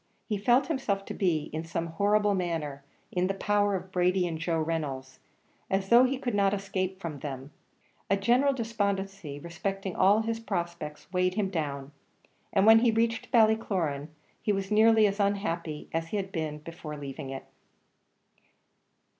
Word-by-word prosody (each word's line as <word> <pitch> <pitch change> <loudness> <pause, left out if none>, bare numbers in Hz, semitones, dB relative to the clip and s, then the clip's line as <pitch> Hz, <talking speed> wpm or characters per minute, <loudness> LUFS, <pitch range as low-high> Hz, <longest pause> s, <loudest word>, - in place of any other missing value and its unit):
He 215 - -1
felt 245 +6 +4
himself 220 -11 -1
to - - -5
be, 165 -6 0
in 160 +1 -3
some 165 0 -3
horrible 205 +5 +2
manner, 160 -7 -2 0.3
in 180 0 +1
the 195 - -1
power 205 0 +1
of 185 0 -6
Brady 180 0 +2
and 165 -2 -4
Joe 165 0 0
Reynolds 145 -5 -3 0.5
as 195 0 0
though 240 +2 +7
he 265 +1 0
could 245 -3 -3
not 200 0 +3
escape 190 -1 -3
from 160 -6 -5
them. 135 0 -6 0.6
A 200 - +3
general 245 +8 +3
despondency 200 - -2
respecting 190 +4 -4
all 200 +3 +5
his 225 0 -2
prospects 170 -7 -4
weighed 180 0 +1
him 200 -3 0
down, 140 -5 -3 0.6
and 195 -1 +3
when 225 +1 +8
he 240 +1 +3
reached 225 0 0
Ballycloran, 195 - +2 0.3
he 210 - +1
was 195 0 -2
nearly 220 0 +6
as 200 0 0
unhappy 175 -6 -1
as 165 0 -1
he 210 - -2
had 195 -1 -3
been 155 -3 -4
in 155 -3 -7
leaving 140 0 -6
it. 135 0 -6
190 Hz, 165 wpm, -28 LUFS, 160-210 Hz, 0.6 s, when